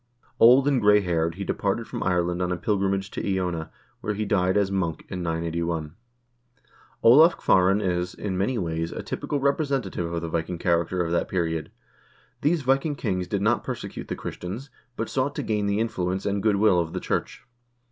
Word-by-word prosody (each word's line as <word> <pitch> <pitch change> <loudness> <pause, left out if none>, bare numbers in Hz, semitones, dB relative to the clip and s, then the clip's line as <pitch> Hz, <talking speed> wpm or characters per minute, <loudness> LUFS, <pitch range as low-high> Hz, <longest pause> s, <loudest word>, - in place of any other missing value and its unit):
Old 125 +4 +7
and 135 -4 +2
gray 105 0 +5
haired, 85 -3 0
he 100 - -5
departed - - -1
from - - -5
Ireland 90 -1 0
on 90 0 0
a 90 - -1
pilgrimage 95 +1 -1
to 95 - -2
Iona, 90 -4 -2 0.3
where 105 - -3
he 110 +1 -2
died 95 -2 +2
as 100 -1 +1
monk 85 -5 -2
in 90 - -4
981. 85 -1 -2 1.1
Olav 155 +9 +7
Kvaaran 95 +2 +3
is, 90 -1 -1
in 100 -3 -4
many 100 +7 0
ways, 80 -3 -2
a - - -6
typical 145 - -3
representative 135 - -1
of 85 0 -3
the - - -2
Viking 85 +2 -2
character 85 +1 +1
of 85 - -3
that 85 - +1
period. 80 -4 -1 0.7
These 155 +1 +1
Viking 135 +3 +1
kings 95 -8 -2
did 100 +2 -1
not 115 +2 +2
perse - - -4
cute - - -8
the - - -3
Christians, 110 +11 -7 0.2
but 115 - -3
sought 140 +2 -1
to - - -3
gain 105 -2 0
the 100 +1 +1
influence 95 -4 -2
and 100 0 0
good 105 -1 +3
will 100 -3 +4
of 85 -1 -2
the - - -2
church. - - -3
95 Hz, 190 wpm, -25 LUFS, 85-110 Hz, 1.1 s, Old